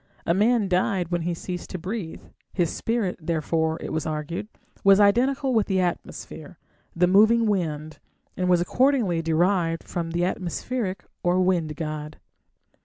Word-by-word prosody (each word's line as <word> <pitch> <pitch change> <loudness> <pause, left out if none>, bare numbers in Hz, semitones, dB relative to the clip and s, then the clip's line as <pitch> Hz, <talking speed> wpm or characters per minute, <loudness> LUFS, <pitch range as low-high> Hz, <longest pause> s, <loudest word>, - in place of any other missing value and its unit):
A 170 - +2
man 215 +2 +3
died 180 -1 0
when 175 -1 -1
he 170 +1 -2
ceased 180 +1 -6
to 185 - -4
breathe; 185 -1 -5 0.3
his 175 -4 0
spirit, 225 -6 -2
therefore, 160 0 0
it - - -6
was 160 0 -2
argued, 155 +5 -4 0.4
was 195 0 +6
identical 260 +6 +3
with 220 -3 +2
the 190 -2 +1
atmosphere 175 -3 -4 0.4
the 175 +1 +4
moving 220 +5 +5
wind 155 -7 -2 0.4
and 180 0 -1
was 175 -1 +4
accordingly 230 -4 +2
derived 165 +1 +1
from 170 -2 -4
the 175 +1 0
atmospheric 190 +3 -3 0.2
or 175 0 +2
wind 175 -5 +1
god. 155 0 -5
180 Hz, 150 wpm, -25 LUFS, 165-200 Hz, 0.4 s, was